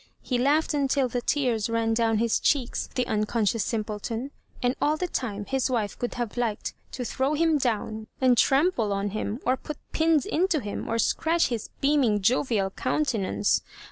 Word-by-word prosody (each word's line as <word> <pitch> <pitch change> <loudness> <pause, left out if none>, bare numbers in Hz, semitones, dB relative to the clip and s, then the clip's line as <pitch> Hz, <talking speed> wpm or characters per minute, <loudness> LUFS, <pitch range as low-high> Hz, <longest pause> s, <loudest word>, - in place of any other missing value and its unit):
He 250 -2 -1
laughed 295 +5 +2
until 275 -2 +2
the 245 0 -2
tears 240 -6 0
ran 230 0 +1
dovm 225 -1 +2
his 230 +1 +2
cheeks, 260 -5 0
the 250 - +1
unconscious 215 0 0
simpleton; 225 +3 -3 0.3
and 245 +2 +2
all 305 +1 +2
the 360 - -1
time 210 -10 -3
his 265 +2 0
wife 220 -5 -1
oould 245 - -3
have 240 -2 -4
liked 230 -4 -1 0.2
to 250 - -4
throw 270 +5 0
him 320 -1 +3
down 220 -3 -2
and 255 -2 +4
trample 270 - +3
on 200 0 -1
him, 215 +2 -3
or 255 - +3
put 300 +2 -7
pins 320 -3 +2
into 345 -1 +1
him, 205 -5 -5
or 230 - 0
scratch 325 +8 +2
his 235 -4 -3
beaming 275 -7 +3
jovial 215 -2 +1
countenance. 215 -7 0
245 Hz, 175 wpm, -26 LUFS, 220-280 Hz, 0.3 s, and